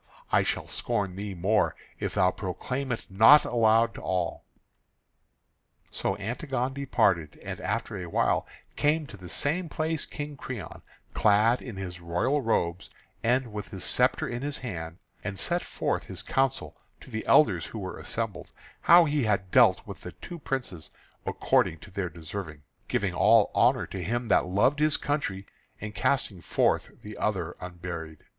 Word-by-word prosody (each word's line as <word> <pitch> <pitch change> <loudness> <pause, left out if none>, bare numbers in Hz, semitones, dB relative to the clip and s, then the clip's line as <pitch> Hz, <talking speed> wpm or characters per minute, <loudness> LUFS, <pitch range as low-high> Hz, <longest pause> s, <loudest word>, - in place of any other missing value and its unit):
I - - +5
shall - - -2
scorn 100 -3 -2
thee 100 0 -5
more 95 +5 +2 0.2
if - - -3
thou 90 0 +4
proclaim 125 +9 -4
it 120 - -3
not 110 +10 +7
aloud 115 -1 +3
to - - -9
all." 90 -2 -2 1.5
So - - -2
Antigone 125 +4 -2
departed; 95 - +1
and - - -6
after 115 +1 -2
a 90 -2 -5
while - - +1 0.3
came 150 +1 +2
to 130 - -11
the 90 -2 -11
same 165 - -1
place 155 +1 -1
King 145 -1 -6
Creon, 130 -5 -7 0.3
clad 110 +3 +4
in 120 -6 -7
his 90 -2 -6
royal 90 +13 0
robes, 90 -6 0 0.3
and 120 0 +1
with 105 -1 -5
his 95 -3 -7
sceptre - - +2
in 120 0 -4
his 145 0 -2
hand, 85 -8 -6 0.3
and 100 -2 -4
set 175 - 0
forth - - -2
his - - -7
counsel 135 -1 0 0.2
to - - -14
the 110 -1 -3
elders 90 - +5
who - - -8
were 95 -3 -5
assembled, 110 -6 -4 0.3
how 170 0 +7
he 145 -4 +1
had 100 -3 0
dealt - - +5
with - - -9
the - - -8
two 175 - -9
princes 125 - -4 0.4
according 80 - +2
to 95 - -14
their 90 -1 -2
deserving, 80 -2 -7 0.2
giving 95 -3 0
all 110 +4 +5
honour - - +3
to - - -6
him 120 +1 -2
that 95 - +4
loved 105 +10 +2
his 155 -1 +3
country 105 -10 -2 0.3
and 105 +1 -6
casting 105 -4 0
forth - - +1
the 105 0 -8
other 90 -5 -1
unburied. 85 -3 -6
105 Hz, 165 wpm, -28 LUFS, 90-130 Hz, 1.5 s, not